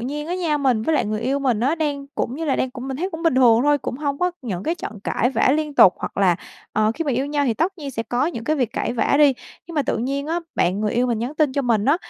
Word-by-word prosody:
nhiên 290 +5 -4
á 350 - -2
nha, 335 -5 0
mình 255 -6 +1
với 320 +6 +1
lại 285 - +2
người 215 +1 -2
yêu 265 +4 0
mình 250 -6 0
á 275 +6 +2
đang 290 -4 -2
cũng 255 - -2
như 325 - -3
là 275 - +1
đang 260 - -1
cũng 255 +1 -7
mình 265 - -3
thấy 365 +7 -3
cũng 325 -1 -7
bình 330 -6 +2
thường 240 -3 +5
thôi, 290 +1 +3
cũng 250 - -5
hông 280 0 -2
có 360 0 +1
những 195 -7 -4
cái 325 - -1
trận 220 -10 -7
cãi 245 - +1
vã 265 - +2
liên 300 0 -1
tục, 185 - +7
hoặc - - -6
là, 185 -3 +3 0.4
ờ, 215 +1 +2
khi 330 - -3
mà 290 - 0
yêu 260 +3 0
nhau 290 0 0
thì 240 -4 +1
tất 360 - -1
nhiên 285 -3 -5
sẽ 225 -3 -3
có 245 +6 0
những 235 -10 -4
cái 310 - +1
việc 250 -6 -1
cãi - - -2
vã 245 - +1
đi. 290 -2 +6 0.3
Nhưng 335 - -9
mà 295 - +2
tự - - -1
nhiên 275 +4 -2
á, 335 +2 -1
bạn 185 +4 +1
người 210 -1 0
yêu 245 +2 +1
mình 235 -3 0
nhắn 245 +6 -4
tin 300 -3 +2
cho 280 - 0
mình 230 -5 +1
á, 285 +6 +4
275 Hz, 315 wpm, -22 LUFS, 235-300 Hz, 0.4 s, tục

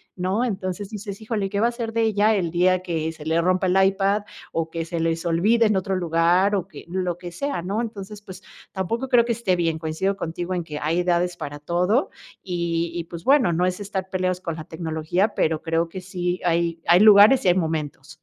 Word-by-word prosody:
¿no? 185 +5 -1
Entonces 195 -3 -3
dices, 205 -1 -7
híjole, 215 -3 -2
¿qué 200 - -1
va 230 - +3
a - - +2
hacer 235 -2 -5
de 230 - +1
ella 215 -1 +3
el 180 -4 0
día 180 +2 +2
que 160 -3 -2
se 160 -2 -12
le 160 +1 +2
rompa 185 +2 +1
el 185 +1 +2
iPad 195 +1 +1 0.3
o 165 0 -2
que 165 -1 -3
se 165 0 -4
les 165 0 -1
olvide 215 +8 +3
en 210 - +1
otro 190 0 -1
lugar, 175 +3 +2
o 190 -2 -2
que - - -12
lo 180 -1 -2
que 175 -1 -8
sea, 280 +3 -3
¿no? 195 +5 -2
Entonces, 210 -2 -7
pues, 190 -2 -10 0.3
tampoco 230 +7 -2
creo 240 -3 +5
que 235 - 0
esté 215 -5 0
bien. 165 -2 0
Coincido 160 +5 -2
contigo 175 +1 -4
en 175 - -2
que 150 -2 -6
hay 165 +4 0
edades 175 0 0
para 145 +1 -6
todo. 180 - +1 0.3
Y 170 -2 -2
y, 170 - -2
pues, 170 0 -9
bueno, 265 -8 +4
no 180 +2 +1
es 180 +1 -2
estar 195 -2 -4
peleados 185 -1 -1
con 165 -3 -4
la 155 - -7
tecnología, 160 +4 -2
pero 155 -1 0
creo 165 0 0
que 185 +2 -7
sí 180 -1 -3
hay 170 -1 0
hay 175 +2 +6
lugares 210 +4 +7
y - - +5
hay - - +6
momentos. 160 -5 -3
180 Hz, 225 wpm, -23 LUFS, 165-200 Hz, 0.3 s, lugares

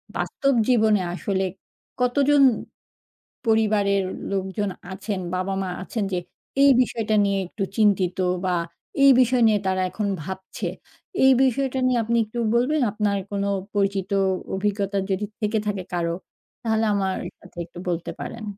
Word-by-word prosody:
বাস্তব 275 -1 0
জীবনে 220 -5 +4
আসলে 190 +1 -1 0.6
কতজন 280 +3 +4 1.0
পরিবারের 210 -3 +2 0.3
লোকজন 195 +1 -1 0.2
আছেন, 195 +1 -4 0.2
বাবা-মা 190 +1 -2
আছেন 215 +1 -3
যে, 180 - +1 0.4
এই 280 - +7
বিষয়টা 225 -3 0
নিয়ে 200 -1 +1
একটু 195 +3 -4
চিন্তিত 195 -4 +3 0.3
বা, 180 -1 +1 0.5
এই 275 - +9
বিষয় 250 0 +3
নিয়ে 210 -2 +3
তারা 185 0 +1
এখন 210 +2 -2 0.2
ভাবছে? 190 +2 -5 0.6
এই 265 - +8
বিষয়টা 265 +1 +1
নিয়ে 250 - +2
আপনি 235 +1 +1
একটু 225 +3 -6 0.2
বলবেন 275 +5 +2
আপনার 205 -1 0
কোনো 200 0 -1 0.3
পরিচিত 195 -1 0
অ - - +2 0.3
অভিজ্ঞতা 200 0 -1
যদি 190 +2 0 0.2
থেকে 215 +1 +1
থাকে 200 -3 -2
কারো? 170 -1 0 0.5
তাহলে 220 -1 +1
আমার 190 -2 0 0.2
সাথে - - -18
একটু 175 - -12
বলতে 170 0 -2
পারেন। 220 - -6
205 Hz, 140 wpm, -24 LUFS, 190-230 Hz, 1.0 s, এই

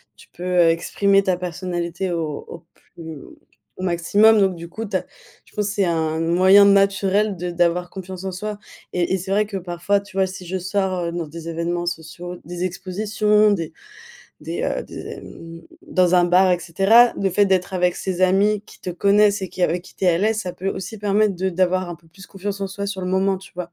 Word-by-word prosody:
Tu - - -18
peux 180 0 -1
exprimer 175 +4 +3
ta 185 -3 0
personnalité 175 0 -3
au 160 -4 -3
au 165 - -10
plus 160 -4 -11 0.6
au - - -7
maximum. 200 +5 +4
Donc 190 -2 +2
du 170 0 -8
coup 200 +6 -6
tu 200 -2 -1
as - - -7 0.4
je - - -24
pense 210 -2 0
c'est 205 -1 0
un 160 -2 0
moyen 185 +5 +6
naturel 200 0 +3
de 180 +1 -4
d'avoir 175 +1 0
confiance 190 -1 -8
en 190 - -2
soi. 210 +3 -5 0.3
Et 180 +1 0
et - - +2
c'est 190 +1 -6
vrai 210 +2 +2
que 205 -1 -8
parfois 185 +2 -1
tu 200 -1 -12
vois 190 -1 +3
si 185 0 -9
je 185 +2 -3
sors, 185 0 -1
heu, 170 - -2
dans 170 -1 -3
des 165 +2 -9
événements 170 +1 -2
sociaux, 175 +1 -6
des 175 +3 -4
expositions, 210 +4 +1
des 165 -6 -2 0.7
des - - -4
heu - - -1
des - - -12 0.2
hem 165 0 -11 0.3
dans 185 - +3
un 175 -1 +5
bar, 180 +1 +4
et 180 - +1
cetera. 195 +8 +5
Le 195 - +2
fait 205 +3 +3
d'être 190 0 0
avec 180 -1 +1
ces 185 -2 -3
amis 200 +3 +3
qui - - -17
te 180 - -4
connaissent 200 +3 +3
et 190 - -3
qui 180 - -5
avec 175 +2 -1
qui - - -17
tu - - -3
es - - +5
à 170 - +1
l'aise, 215 +3 +1
ça 180 -4 -5
peut 190 +2 -4
aussi 195 +3 -5
permettre 205 0 +2
de 185 +2 -1
d'avoir 185 0 +1
un 170 - -6
peu 165 0 -26
plus 185 +3 -15
confiance 200 +1 -5
en 195 - -2
soi 200 +1 -5
sur 200 -1 -4
le 180 - -3
moment, 190 +1 +1
tu 190 - -15
vois? 175 -1 -6
185 Hz, 225 wpm, -21 LUFS, 175-200 Hz, 0.7 s, moyen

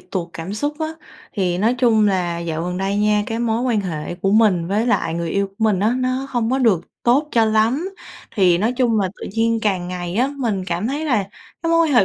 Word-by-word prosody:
tụt 175 -3 -4
cảm 165 +4 -6
xúc 290 +7 -2
á. 315 - 0 0.5
Thì 180 -4 0
nói 225 +6 +2
chung 220 -4 +4
là 175 -3 -1
dạo 165 -1 -3
gần 180 +1 -3
đây 195 +2 -1
nha, 210 0 +2
cái 225 - -3
mối 230 -1 0
quan 240 -4 +1
hệ 170 -4 -4
của 195 +2 -1
mình 200 -6 +3
với 210 +4 +1
lại 195 -8 +1
người 170 -1 -3
yêu 200 +2 0
của 195 - -21
mình 215 -4 +2
á, 220 +4 +2
nó 255 +1 -1
hông 240 -3 -1
có 265 - +1
được 225 -10 +3 0.2
tốt 275 +6 +3
cho 230 -4 +3
lắm, 225 +10 +1 0.5
thì 180 -5 +4
nói 220 +6 +1
chung 240 -4 +1
là 190 - 0
tự - - -5
nhiên 230 0 +2
càng 185 -4 0
ngày 175 -1 -4
á, 255 +4 +2
mình 215 -8 -1
cảm 180 +3 -2
thấy 285 +5 -2
là 245 -9 +2 0.4
cái 330 - 0
mối 330 - +4
quan 300 - -1
hệ 220 - +6
215 Hz, 245 wpm, -20 LUFS, 185-240 Hz, 0.5 s, hệ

